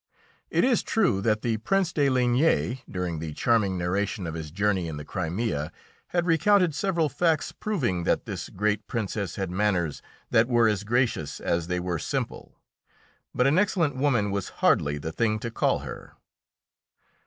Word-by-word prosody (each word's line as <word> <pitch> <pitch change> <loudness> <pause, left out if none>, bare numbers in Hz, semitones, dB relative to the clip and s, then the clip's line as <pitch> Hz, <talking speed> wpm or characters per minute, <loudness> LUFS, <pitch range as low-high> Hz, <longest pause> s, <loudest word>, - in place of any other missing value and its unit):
It - - +2
is 250 -2 +3
true 175 - +1
that 110 +1 +1
the 115 -2 0
Prince 185 - 0
de 145 -2 +2
Ligne, 125 +1 +2
during 90 -3 -3
the 80 -1 -5
charming 110 -6 +2
narration 100 +3 -1
of 80 - -4
his 80 -2 -6
journey 95 +1 0
in 80 -2 -5
the 75 - -7
Crimea, 85 -3 -2 0.4
had 175 -1 0
recounted 180 +1 +3
several 170 -1 +1
facts 155 +2 +1
proving 125 - -1
that - - +1
this - - -5
great 105 +1 -1
Princess 100 -5 -3
had 95 -3 -3
manners 90 -6 0 0.3
that 110 +1 +4
were 120 -2 +4
as 105 -2 0
gracious 115 - 0
as 85 -1 -1
they 90 0 -1
were 90 -2 -2
simple, - - -4 0.8
but 125 - +3
an 145 +6 +4
excellent 180 -8 +1
woman 125 -7 +1
was 100 -2 -2 0.2
hardly 75 0 +3
the 80 +2 -5
thing 110 +4 +1
to 115 +2 -5
call - - +1
her. - - -9
110 Hz, 165 wpm, -26 LUFS, 90-140 Hz, 0.8 s, that